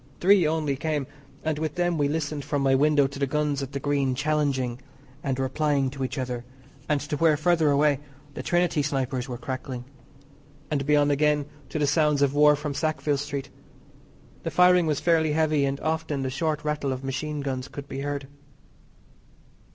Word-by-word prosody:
Three 185 -2 +5
only 155 -3 0
came, 150 0 -2 0.4
and 155 -1 -1
with 155 0 -2
them 175 -1 +1
we 145 - +3
listened 150 -1 -2
from 145 -1 -1
my 135 -1 +3
window 145 +1 +4
to 140 +1 -5
the 140 - +1
guns 150 0 0
at 135 0 -5
the 140 - -2
Green 140 -2 0
challenging 140 -4 0 0.4
and 135 -2 -1
replying 135 0 0
to 135 -1 -5
each 130 - -3
other, 125 -2 -3 0.5
and 150 -1 +2
to 145 0 -3
where, 155 -1 +4
further 160 0 +3
away, 145 -1 +3 0.3
the - - -5
Trinity 175 -3 +1
snipers 135 -2 -2
were 120 - -4
crackling, 130 -1 -5 0.9
and 140 -2 -1
beyond 145 -1 +4
again 150 0 +2 0.2
to - - -3
the 150 - +2
sounds 150 -1 +3
of 140 -1 +2
war 150 0 +6
from 145 0 -4
Sackville 155 -1 0
Street. 140 -1 -4 0.9
The - - -3
firing 180 -1 +5
was 150 -3 +1
fairly 160 -3 +2
heavy, 155 -2 +2
and 135 0 -2
often 155 -3 -1
the 130 - -2
short 150 +2 -1
rattle 150 -2 -1
of 130 0 -4
machine 150 +2 -3
guns 130 -1 -3
could 145 -1 -8
be 135 - -5
heard. 140 0 -3
145 Hz, 180 wpm, -26 LUFS, 135-155 Hz, 0.9 s, war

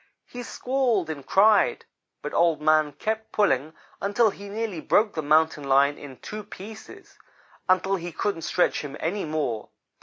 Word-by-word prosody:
He 245 - -8
squalled 245 -8 -1
and 140 -3 -7
cried, 205 +7 +3 0.4
but - - -5
Old 170 -3 +3
man 155 -1 +3
kept 220 +7 -3
pulling 160 -7 +1 0.3
until 205 +2 +2
he 200 +1 -10
nearly 210 -5 -4
broke 210 +5 +2
the 160 - -2
Mountain 155 0 +2
lion 140 +1 +4
in 135 -3 -10
two 215 0 -7
pieces 215 +2 -12 0.5
until 190 +1 +3
he 175 0 -6
couldn't 180 0 -2
stretch 180 - +1
him 145 -1 -7
any 190 +4 -2
more. 150 -8 -3
175 Hz, 155 wpm, -25 LUFS, 155-210 Hz, 0.5 s, lion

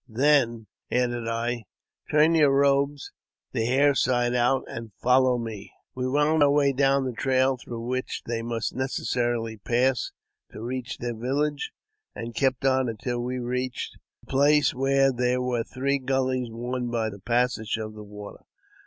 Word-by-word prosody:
"Then," 120 -2 +2 0.2
added 120 -2 0
I, 115 0 -2 0.2
*' - - -37
turn 155 +2 +4
your 155 -3 +5
robes 140 +1 +2 0.4
the 115 - -1
hair 140 +3 +4
side 120 -2 +1
out, 125 +2 +2
and 115 -1 -7
follow 125 0 +4
me." 115 -4 -6 0.2
We 125 0 -2
wound 150 +3 +2
our 145 - +6
way 140 -1 +3
down 135 0 +2
the 130 - -1
trail 130 +3 +2
through 120 -2 -7
which 130 +1 -3
they 115 -1 -2
mufi 115 -1 -3
necessarily 120 -3 -1
pass 125 +4 +1 0.4
to - - -8
reach 125 +1 -4
their 120 0 -3
village, 140 +5 -1 0.5
and 115 0 -6
kept 130 +1 0
on 130 -2 +3
until 120 +2 -3
w 125 +1 -3
reached 125 +1 -3 0.3
a - - -18
place 145 +2 +3
where 135 +1 +3
there 125 +1 +1
were 125 -2 -1
three 140 +3 -1
gullies 130 -2 0
worn 120 +2 -3
by 115 -2 -1
th 100 -1 -12
passage 120 -2 0
of 110 -1 -5
the 105 0 -9
water. 105 0 -10
125 Hz, 160 wpm, -26 LUFS, 120-135 Hz, 0.5 s, our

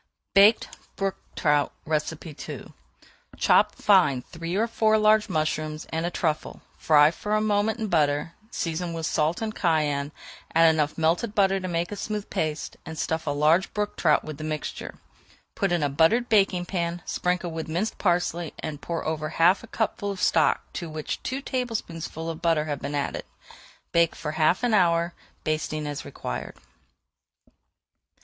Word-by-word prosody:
BAKED 205 +3 +6 0.3
BROOK 195 -1 -2 0.2
TROUT 150 -2 +2 0.2
II 155 0 -4 0.6
Chop - - +4
fine 130 -3 +4
three 165 +1 -5
or 215 +3 +2
four 220 -1 +2
large 215 0 +4
mushrooms 155 -2 -1
and 165 +1 0
a - - 0
truffle, 155 -3 -2 0.2
fry 150 -1 +5
for 210 +5 -2
a - - +3
moment 215 +1 +1
in 220 - -2
butter, 150 -3 +1 0.2
season 170 -3 -3
with 165 -1 -3
salt 155 +8 0
and 215 -1 -3
cayenne, 150 -6 0 0.4
add 165 0 +7
enough 150 -2 0
melted 170 +7 +1
butter 195 -2 +3
to 185 - -4
make 170 +1 -2
a - - -3
smooth 210 0 -4
paste, 155 -5 -2
and 160 0 -8
stuff 160 0 -2
large 150 +5 +3
brook 210 0 -1
trout - - +3
with 155 -1 -7
the - - -5
mixture. 155 -1 -4 0.6
Put 195 -2 0
in 175 -3 +1
a - - +3
buttered 165 - +3
baking 195 -4 +3
pan, 170 -2 -3
sprinkle 180 -1 -1
with 160 0 -5
minced 175 +8 -2
parsley, 175 -3 0
and 150 -2 -6
pour 170 -1 -4
over 155 -1 -2
half 170 +4 +4
a - - -10
cupful 205 -2 -2
of 195 -2 -4
stock - - +3
to 170 -3 -5
which 155 -1 -4
two 265 +2 -3
tablespoonfuls 170 - -3
of 165 +1 -9
butter 165 -3 +2
have 145 -3 -4
been 145 +1 -3
added. 140 - -2 0.7
Bake 170 -1 +3
for 150 - -4
half 160 +7 +2
an 240 -2 +2
hour, 170 -3 +3 0.3
basting 155 -1 -2
as 145 -1 -4
required. 60 - -6
165 Hz, 165 wpm, -26 LUFS, 155-195 Hz, 0.7 s, add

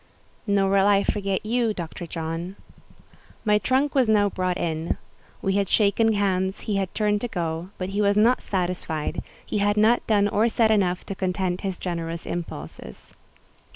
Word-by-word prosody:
"Nor 200 -1 +2
will 195 0 +4
I 200 -1 +4
forget 195 -1 -1
you, 230 -1 +1
Dr. 170 0 -6
John." 165 +3 -4 0.9
My 210 -1 +4
trunk 265 +5 +1
was 260 -5 +3
now 205 -2 +4
brought 185 0 -1
in. 165 -1 -2 0.5
We 195 - +1
had 200 -2 0
shaken 220 +1 +3
hands; 190 -2 0
he 205 -2 -1
had 190 -2 -1
turned 210 -1 +1
to 245 - -1
go, 170 -3 -3
but 185 0 -3
he 200 +2 -1
was 200 0 +3
not 235 +4 +4
satisfied: 175 -5 -2 0.2
he 210 - -2
had 205 +1 +2
not 220 +3 +3
done 205 -2 +3
or 210 +3 +2
said 225 -1 +3
enough 185 -4 +1
to - - -4
content 185 -1 -2
his 190 -3 -3
generous 170 -2 -4
impulses. 80 - -7
195 Hz, 170 wpm, -24 LUFS, 180-210 Hz, 0.9 s, will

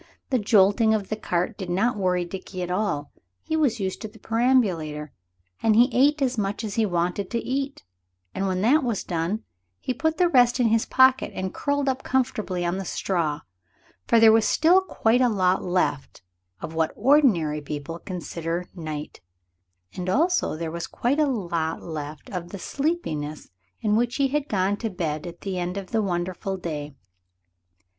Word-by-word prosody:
The 255 - +3
jolting 210 +2 +4
of 205 -3 -3
the 215 - -1
cart 185 +1 -2
did 185 -3 -5
not 215 +8 +1
worry 180 -3 0
Dickie 185 0 -6
at 180 - -4
all. 180 -7 -1 0.3
He 315 - -2
was 275 -8 +1
used 190 -1 -3
to 220 - -4
the 220 +1 -16
perambulator; 195 - +1 0.5
and 220 -1 +3
he 240 +2 +5
ate 280 +4 +3
as 255 -3 0
much 200 +2 -2
as 210 -2 -4
he 220 0 +1
wanted 180 +2 -1
to 235 - -1
eat, 270 +3 -3 0.5
and 195 +1 -1
when 185 -1 -1
that 275 +8 +4
was 235 -5 -1
done 175 +5 -2 0.4
he 255 - -2
put 320 +5 -1
the 360 - +4
rest 245 -5 +4
in 240 -2 +4
his 225 0 +2
pocket 260 0 +4
and 185 0 -3
curled 285 -1 -1
up 265 -1 0
comfortably 220 -9 -1
in 175 +2 -1
the - - -3
straw, 165 -5 -1 0.7
for 230 - +5
there 225 -1 +8
was 220 0 +4
still 345 +4 +5
quite 245 -9 +1
a 250 - +4
lot 185 -3 +2
left 175 - -1 0.4
of 160 - -6
what 160 -1 +1
ordinary 205 - +3
people 150 +3 -6
consider 170 -1 -4
night, 155 - -6 0.7
and 180 0 -4
also 340 - +2
there 165 0 -4
was 170 0 -4
quite 265 +5 0
a 305 - +4
lot 170 - -2
left 150 -2 -6
of 175 -3 -5
the 200 - -7
sleepiness 175 - -3 0.3
with 210 - +2
which 240 +3 +1
he 275 -1 +2
had 295 +1 -1
gone 195 0 +1
to 225 - -3
bed 165 -3 -3
at 175 0 -10
the 190 -2 -3
end 180 +2 -3
of 195 -2 -6
the 225 -2 +2
wonderful 185 0 -2
day. 150 -5 -5
195 Hz, 180 wpm, -25 LUFS, 175-245 Hz, 0.7 s, there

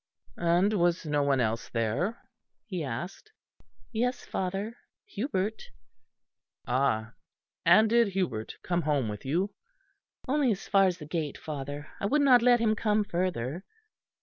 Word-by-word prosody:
"And 175 +5 +3
was 175 -3 +1
no 150 -1 +1
one 140 -2 +2
else 115 0 -1
there?" 115 - -1 0.5
he 185 -7 -4
asked. 180 - -6 0.6
"Yes, 245 +2 -1
father, 195 +5 -3 0.3
Hubert." 215 -2 -2 1.0
"Ah! 120 -3 0 0.5
And 220 +1 +7
did 235 0 +4
Hubert 180 - -2
come 175 -1 0
home 145 -7 0
with 105 +3 -7
you?" 175 +9 0 0.8
"Only 275 0 +2
as 195 - -8
far 195 -1 +5
as 180 -1 -1
the 155 - -9
gate, 155 -2 -3
father. 145 0 -6
I 200 - 0
would 290 +6 +3
not 255 -4 +7
let 245 0 +5
him 220 -1 +2
come 210 -1 +1
further." 175 - -2
180 Hz, 140 wpm, -29 LUFS, 145-215 Hz, 1.0 s, And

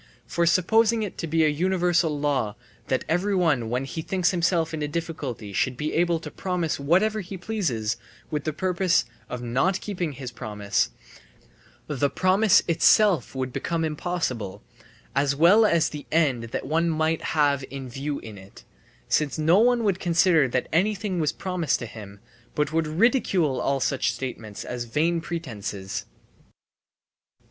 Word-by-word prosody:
For 170 0 0
supposing 220 +6 +3
it 205 - -5
to 165 - -3
be 160 0 +2
a - - +4
universal 170 -1 +1
law 135 -8 0 0.3
that 130 - 0
everyone 170 - +1
when 125 +3 -1
he 160 +4 -5
thinks 180 +1 +1
himself 170 -2 +1
in 155 - -3
a 150 - -1
difficulty 145 -10 -5
should 125 +5 0
be 150 +3 -2
able 170 0 +2
to - - -8
promise 180 -5 -2
whatever 190 +9 +2
he 190 +1 -7
pleases, 170 - -2 0.3
with 150 -2 -2
the 155 - -1
purpose 185 +2 +1 0.2
of 125 -1 -5
not 135 +11 +1
keeping 180 -7 -3
his 130 -1 -7
promise, 105 -3 -1 1.0
the 145 -1 0
promise 185 +4 +4
itself 170 - +4
would 130 -1 -3
become 165 -1 -1
impossible, 150 - -3 0.5
as 140 0 +2
well 190 +9 +6
as 170 -4 +2
the 150 -1 -8
end 140 -8 +2
that 115 - -5
one 165 +2 +1
might 160 0 0 0.2
have 140 -2 +3
in 135 -1 -7
view 140 +4 -4
in 105 -3 -10
it, 95 +1 -15 0.4
since 150 -2 +1
no 160 +5 +4
one 240 +1 +3
would 195 -3 +1
consider 170 -4 +3
that 125 0 -1
anything 195 +1 +1
was 155 -2 +1
promised 180 -6 -1
to 120 - -6
him, 105 -3 -10 0.4
but 150 0 0
would 165 -1 +1
ridicule 175 - +2
all 140 0 0
such 130 -2 +1
statements 115 -4 -6
as 120 -1 -4
vain 165 +8 0
pretences. 110 - -5
160 Hz, 155 wpm, -25 LUFS, 130-180 Hz, 1.0 s, well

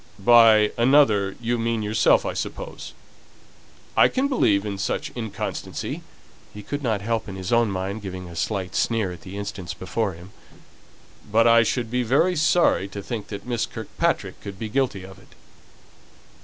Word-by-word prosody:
"By 110 -1 +6
'another,' 115 -7 +4
you 120 +1 -1
mean 115 -1 -1
yourself, 105 +1 +3
I - - -2
suppose. - - -6 1.0
I - - +6
can 265 +2 0
believe 105 - +2
in 100 -2 -4
such 145 +9 -2
inconstancy" 110 -4 -5 0.5
(he 105 - -10
could 145 +7 -4
not 110 -6 -1
help, 115 0 -2
in 95 - -7
his 95 +4 -3
own 115 -2 +3
mind, 95 +2 -3
giving 95 -2 -7
a 85 - -10
slight 90 +3 -2
sneer 110 -5 0
at 85 -2 -10
the 95 +3 -9
instance 100 -3 -5
before 100 +2 -2
him), 85 +4 -13 1.0
"but 115 +2 +4
I 115 0 +7
should 115 0 -1
be 125 0 +1
very 140 +10 +2
sorry 160 - +3
to 100 0 -8
think 110 -2 -5
that 100 - -7
Miss 120 -2 -1
Kirkpatrick 110 -2 -2
could 100 -1 -8
be 110 +1 -5
guilty 120 -5 -1
of 95 0 -12
it." - - -21
110 Hz, 170 wpm, -23 LUFS, 95-120 Hz, 1.0 s, I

